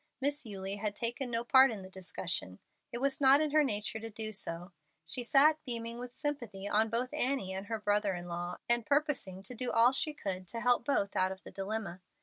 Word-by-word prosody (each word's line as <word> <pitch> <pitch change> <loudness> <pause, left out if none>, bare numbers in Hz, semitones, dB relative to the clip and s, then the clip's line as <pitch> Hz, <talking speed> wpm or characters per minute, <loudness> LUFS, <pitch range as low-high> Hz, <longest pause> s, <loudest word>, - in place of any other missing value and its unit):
Miss 285 -1 0
Eulie 195 -1 -4
had 205 0 -3
taken 240 +3 -2
no 230 0 -1
part 265 +2 +6
in 210 -4 -6
the - - -9
discussion. 180 - -3 0.3
It - - -3
was 275 +2 -1
not 270 +1 +7
in 305 -1 +1
her 305 0 +5
nature 210 -4 -1
to 225 +1 -7
do 215 0 -4
so. 175 -3 -3 0.3
She 245 +10 +1
sat 300 +5 +4
beaming 235 -3 -2
with 250 0 -8
sympathy 240 -10 -4
on 220 +2 +2
both 240 +3 -2
Annie 250 -8 0
and 190 +1 -6
her 225 -1 -3
brother 205 -2 +1
in 175 0 -7
law, 175 +1 -4
and 235 0 +4
purposing 280 - -1
to 210 - -6
do 245 +1 -3
all 230 +2 +5
she 295 +3 +1
could 185 -7 -5
to 230 - -4
help 245 0 +2
both 205 -8 0
out 185 0 +2
of 190 - -9
the - - -11
dilemma. 195 -2 -5
225 Hz, 220 wpm, -32 LUFS, 195-260 Hz, 0.3 s, not